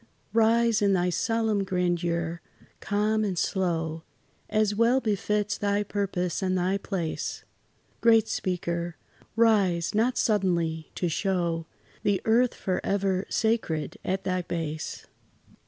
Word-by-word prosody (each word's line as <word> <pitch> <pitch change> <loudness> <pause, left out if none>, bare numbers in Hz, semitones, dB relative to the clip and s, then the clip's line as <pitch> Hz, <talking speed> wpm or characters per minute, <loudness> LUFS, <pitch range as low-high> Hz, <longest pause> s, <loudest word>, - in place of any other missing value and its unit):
Rise 230 0 +3
in 200 -1 +3
thy 180 -1 +2
solemn 220 0 +1
grandeur, 175 -2 -1 0.4
calm 215 +1 +1
and 195 -4 -1
slow, 165 -4 -1 0.5
As 215 -1 +2
well 230 +5 +3
befits 210 -2 -1
thy 205 0 +1
purpose 195 -3 -2
and 185 -1 +1
thy 185 +2 +1
place: 180 -6 -3 0.6
Great 225 -1 +5
Speaker! 170 -2 -2 0.4
rise, 200 -7 +3
not 230 +4 +2
suddenly, 170 -7 +1
to 180 - -1
show 170 -2 -1 0.3
The 200 -2 +1
earth 235 +2 +3
forever 190 0 -1
sacred 220 -9 -1
at 190 +1 -1
thy 185 0 0
base. 160 -3 -4
195 Hz, 115 wpm, -27 LUFS, 175-215 Hz, 0.6 s, Great